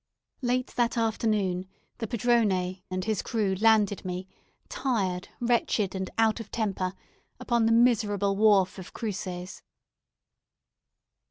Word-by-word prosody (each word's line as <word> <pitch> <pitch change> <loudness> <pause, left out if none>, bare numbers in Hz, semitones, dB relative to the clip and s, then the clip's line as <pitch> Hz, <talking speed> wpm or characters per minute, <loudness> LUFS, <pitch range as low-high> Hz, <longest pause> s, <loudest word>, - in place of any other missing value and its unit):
Late 250 0 -1
that 240 0 +1
afternoon, 210 -5 0 0.3
the 225 - -3
padrone 200 -6 +1
and 185 0 -3
his 215 -3 0
crew 210 -5 0
landed 215 -3 +4
me, 185 0 -4 0.4
tired, 195 -9 -1
wretched, 235 -4 +1
and 190 -1 -3
out 225 0 +3
of 225 - -8
temper, 195 -4 -2 0.4
upon 235 -2 +1
the - - +3
miserable 215 -4 +3
wharf 200 -3 +4
of 185 - -10
Cruces. 185 -4 -5
210 Hz, 115 wpm, -27 LUFS, 185-230 Hz, 0.4 s, landed